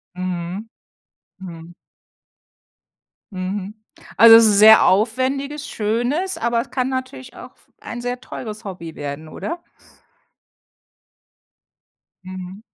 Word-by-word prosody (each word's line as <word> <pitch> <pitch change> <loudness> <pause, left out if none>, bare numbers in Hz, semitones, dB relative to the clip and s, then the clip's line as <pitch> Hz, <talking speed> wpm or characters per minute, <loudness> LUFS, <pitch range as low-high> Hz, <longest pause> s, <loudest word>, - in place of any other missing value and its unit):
Mhm, 180 +3 -5 0.7
Mhm. 170 -2 -10 1.6
Mhm. 190 +2 -5 0.4
Also 225 0 +9
sehr 215 0 +7
aufwendiges, 265 +8 0
schönes, 245 - -1
aber 235 0 0
es - - -7
kann 255 -1 -1
natürlich 260 -1 -6
auch - - -12 0.3
ein 240 - -7
sehr 245 +1 -4
teures 215 -4 -8
Hobby 170 -5 -8
werden, 145 +2 -6
oder? 340 - -6 2.6
Mhm. 185 +1 -9
215 Hz, 90 wpm, -20 LUFS, 185-255 Hz, 2.6 s, Also